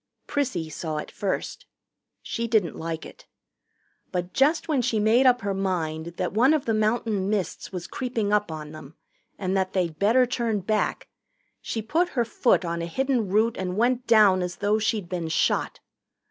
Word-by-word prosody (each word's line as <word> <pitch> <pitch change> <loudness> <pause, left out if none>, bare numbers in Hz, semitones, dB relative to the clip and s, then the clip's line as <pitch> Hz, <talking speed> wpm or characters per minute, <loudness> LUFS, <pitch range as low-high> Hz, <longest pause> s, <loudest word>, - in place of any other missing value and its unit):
Prissy 250 - -1
saw 155 0 -4
it 150 - -5
first. 195 -2 -3 0.6
She 235 0 -3
didn't 220 -7 +1
like 160 0 -5
it. - - -14 0.8
But 180 0 -3
just 300 +4 +2
when 295 -5 +1
she 225 -2 0
made 230 +5 +4
up 250 -1 +4
her 200 0 -1
mind 170 -4 -2
that 180 - -2
one 255 +8 +4
of 300 - -2
the 225 - +1
mountain 215 -2 0
mists 200 -4 -2
was 180 -2 -5
creeping 225 -1 -2
up 210 -4 +1
on 155 -1 -7
them 155 -1 -11 0.4
and 190 0 -2
that 190 -1 0
they'd 170 -5 -1
better 230 +6 +4
turn 235 -4 -1
back, 215 +3 -1 0.5
she 225 - -4
put 335 +10 +1
her 240 - +3
foot 230 -3 +2
on 170 0 -2
a 170 - -3
hidden 255 +1 0
root 220 +4 +2
and 185 0 -3
went 245 +2 +1
down 205 -5 +6
as 180 0 -3
though 210 +1 +1
she'd 215 -3 -1
been 170 -2 -3
shot. 160 - 0
205 Hz, 180 wpm, -25 LUFS, 180-235 Hz, 0.8 s, down